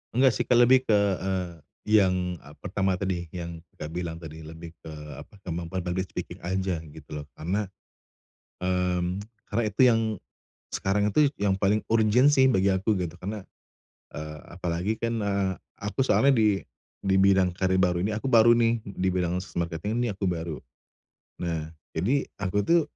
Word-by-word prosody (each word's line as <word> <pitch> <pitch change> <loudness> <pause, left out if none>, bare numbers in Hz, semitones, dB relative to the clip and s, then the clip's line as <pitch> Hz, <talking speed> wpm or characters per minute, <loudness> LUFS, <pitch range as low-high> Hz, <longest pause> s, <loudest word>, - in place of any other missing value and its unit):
Enggak 130 0 +5
sih, - - +3
Kak, 125 - +4
lebih 130 +1 +5
ke, 110 - +5 0.2
eee, 95 -1 -1 0.5
yang, 90 -2 +1
eee, 75 +1 -15
pertama 95 0 0
tadi 90 -3 -2
yang, 85 -1 -5 0.2
Kakak, 75 - -7
bilang 85 -1 -3
tadi, 80 0 -9
lebih 80 +1 -9
ke 80 - -10 0.3
apa, - - -13
kemampuan 85 +1 -4
public 90 +1 -2
speaking - - -6
aja 95 -1 -1
gitu 75 0 -13
loh. 75 -1 -5
Karena, 100 +6 -2 0.9
mmm, 90 0 0 0.3
karena 115 +3 0
itu 105 +4 0
yang 115 -1 +3 0.7
sekarang 100 +1 +1
itu 150 +3 +5
yang 100 -1 +1
paling 105 +2 +2
urgent 115 +5 +5
sih 130 -2 +5
bagi 100 -5 +3
aku 95 +2 +1
gitu. 90 -2 -3
Karena, 100 +1 -5 0.7
eee, 75 +1 -7 0.2
apalagi 90 +5 -1
kan, 115 -2 -1
eee, 100 -2 0 0.3
aku 105 +6 -1
soalnya 135 +1 +4
di 105 -4 +3 0.4
di 95 -1 +1
bidang 95 -2 +4
karir 95 0 +1
baru 90 -1 +2
ini 105 - 0
aku 110 +6 -3
baru 120 -2 +6
nih, 115 -1 +3
di 95 -2 -3
bidang 90 -1 0 0.2
marketing 85 +8 -1
ini 120 - 0
aku 95 -1 -2
baru. 85 -3 -3 0.8
Nah, 80 -3 -3 0.2
jadi 120 - +1 0.2
aku 100 +1 0
tuh 170 0 +5
95 Hz, 165 wpm, -27 LUFS, 85-105 Hz, 0.9 s, baru